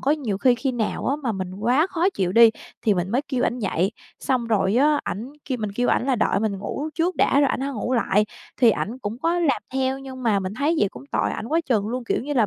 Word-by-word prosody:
có 275 - +1
nhiều 250 -11 -1
khi 245 +3 +4
khi 255 +2 -2
nào 225 -3 -2
á 280 - +1
mà 235 - 0
mình 185 -2 -5
quá 245 - +2
khó 365 +1 +1
chịu 185 -2 0
đi 230 +2 +8 0.3
thì 210 - +3
mình 180 +1 -2
mới 255 +5 +1
kêu 255 -3 0
ảnh 250 - -2
dậy, 195 -2 0 0.3
xong 255 -3 0
rồi 210 -2 +1
á, 295 +3 +4
ảnh 230 +8 -5
kêu 260 -3 -3
mình 205 -2 -3
kêu 245 +2 0
ảnh 250 - +2
là 260 -3 +2
đợi 205 - +1
mình 210 -3 -1
ngủ 275 +9 -4
trước 345 +3 0
đã 280 - +3
rồi 280 - +4
ảnh - - -2
hãy 275 - -2
ngủ 245 +2 -3
lại 210 -3 +2 0.3
thì 240 -3 +6
ảnh 225 +3 -3
cũng 225 0 -5
có 335 +4 +1
làm 310 -7 +1
theo 265 0 0
nhưng 260 -1 -9
mà 220 -4 +2
mình 190 +2 -4
thấy 295 +6 +1
vậy 205 - +3
cũng 125 -5 -12
tội - - +1
ảnh - - -5
quá 325 +2 +2
chừng 215 -5 +1
luôn, 250 +1 -3
kiểu - - -1
như 290 - -4
là 235 -6 +3
245 Hz, 275 wpm, -23 LUFS, 210-275 Hz, 0.3 s, đi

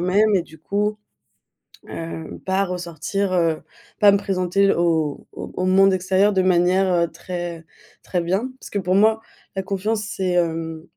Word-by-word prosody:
même. 200 +4 +3
Et 180 - +1
du 160 -1 -16
coup, 205 +6 -1 0.9
hem, 165 -1 -7
pas 190 +1 0
ressortir, 180 +2 -3
heu 165 -3 +1 0.4
pas 205 -1 +7
me 200 - +4
présenter 195 0 +1
au 160 -4 0
au - - -8
au 185 - -1
monde 195 +1 +5
extérieur 190 +2 +2
de 190 - +3
manière, 185 +1 +3
heu, 170 -1 +2
très 175 -2 -6 0.4
très 180 - -1
bien. 190 +9 -1
Parce - - -11
que 205 - -2
pour 185 0 0
moi, 220 +2 +4 0.3
la 190 - -2
confiance, 205 +3 -1
c'est 190 -3 -2
hem, 165 -2 -1
185 Hz, 165 wpm, -22 LUFS, 170-195 Hz, 0.9 s, pas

